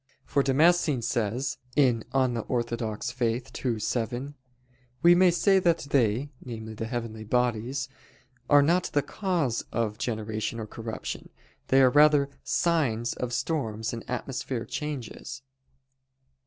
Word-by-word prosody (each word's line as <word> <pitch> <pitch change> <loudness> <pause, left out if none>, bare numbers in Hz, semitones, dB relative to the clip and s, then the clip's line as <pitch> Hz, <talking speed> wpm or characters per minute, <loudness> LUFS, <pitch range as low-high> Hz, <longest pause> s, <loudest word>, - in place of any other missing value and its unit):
For 140 - +2
Damascene 150 -1 +3
says 120 +3 -1 0.2
(De 135 -4 +5 0.2
Fide 130 -2 +1
Orth. 120 0 -2 0.4
ii, 120 -4 0
7): 120 +5 -2 0.7
"We 175 +2 +7
say 190 +3 +4
that 170 -2 +3
they" 125 +2 +2
namely, 110 -3 -7
the 110 +1 -5
heavenly 115 -2 -4
bodies 125 +3 0 0.6
"are 145 -1 +7
not 175 +5 +2
the 145 - +2
cause 165 - -1
of 110 -2 -1
generation 110 0 -3
or 110 - -4
corruption: 110 +1 -6 0.4
they 135 0 +5
are 130 - +6
rather 145 -1 +5
signs 125 -9 +1
of 125 -1 -4
storms 115 -6 -2
and 115 - -5
atmospheric 125 -1 -4
changes." 135 -3 -5
125 Hz, 120 wpm, -27 LUFS, 115-145 Hz, 0.7 s, We